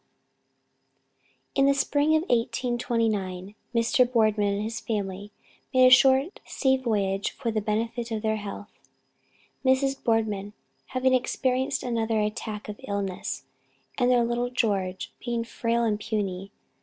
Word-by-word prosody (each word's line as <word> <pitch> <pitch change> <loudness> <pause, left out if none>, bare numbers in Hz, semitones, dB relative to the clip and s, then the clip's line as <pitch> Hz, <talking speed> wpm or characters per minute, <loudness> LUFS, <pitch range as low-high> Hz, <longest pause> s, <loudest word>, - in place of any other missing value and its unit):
B. 275 - +1
In 275 - +5
the 280 - +4
spring 290 +2 +2
of 315 - +2
1829 230 - -1 0.2
Mr. 240 +2 +3
Boardman 215 -4 +2
and 205 - -2
his 225 +2 -4
family 205 -2 -4 0.4
made 255 -2 +5
a 255 - +7
short 265 +6 +5
sea 265 -2 +1
voyage 205 -6 0
for 235 -4 -4
the 215 -1 -1
benefit 230 +3 -2
of 220 -1 -3
their 220 0 +1
health, 205 0 -7 0.9
Mrs. 270 +1 +2
Boardman 210 -3 0 0.3
having 260 0 +1
experienced 255 +1 0
another 225 -2 0
attack 210 0 -3
of 210 0 -8
illness, 200 -2 -3 0.6
and 245 -1 +3
their 245 -1 +4
little 240 +1 -1
George 195 -7 -1
being 235 -1 -1
frail 235 0 -1
and 215 -2 +1
puny. 195 -3 -3
230 Hz, 135 wpm, -26 LUFS, 210-250 Hz, 0.9 s, a